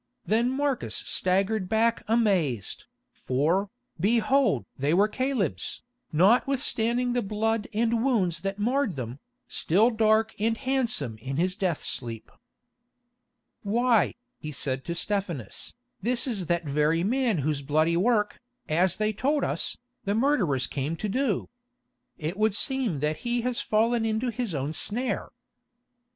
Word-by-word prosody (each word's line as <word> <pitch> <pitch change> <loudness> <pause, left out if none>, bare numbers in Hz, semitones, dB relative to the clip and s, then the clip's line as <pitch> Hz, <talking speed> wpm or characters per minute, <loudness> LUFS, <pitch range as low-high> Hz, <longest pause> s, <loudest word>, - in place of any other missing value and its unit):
Then 230 +3 +2
Marcus 275 0 -1
staggered 190 +1 0
back 225 +1 +2
amazed, 190 - +1 0.3
for, 165 +10 0 0.3
behold! 230 - +2
they 145 +5 +1
were 200 +3 +4
Caleb's, 215 - -2 0.3
notwithstanding 240 - +2
the 245 - +1
blood 220 +1 -1
and 230 +1 +1
wounds 185 -11 +1
that 195 0 -3
marred 240 - 0
them, 125 0 -6 0.3
still 210 +9 +2
dark 220 0 +2
and 225 +2 +1
handsome 240 - -1
in 135 +4 -4
his 180 +2 +1
death 185 -7 -1
sleep. 115 -3 -3 1.3
"Why," 230 +2 +2 0.2
he 155 - -6
said 130 -2 -3
to 170 - -3
Stephanus, 175 - -3 0.3
"this 235 +3 +3
is 205 - -2
that 170 -1 0
very 150 +3 +1
man 240 0 +1
whose 145 0 -1
bloody 155 +4 +2
work, 210 +3 +1 0.3
as 175 +3 +2
they 215 0 0
told 280 +7 0
us, - - 0 0.3
the 200 +1 0
murderers 215 - +2
came 140 +5 -3
to 210 +5 -3
do. 250 -2 0 0.7
It 160 +3 -4
would 215 -2 +3
seem 245 - +1
that 150 +1 0
he 240 0 -1
has 250 0 -1
fallen 225 +2 +2
into 220 +3 0
his 225 -6 -3
own 140 +2 -2
snare." 245 +9 -2
210 Hz, 135 wpm, -27 LUFS, 160-235 Hz, 1.3 s, were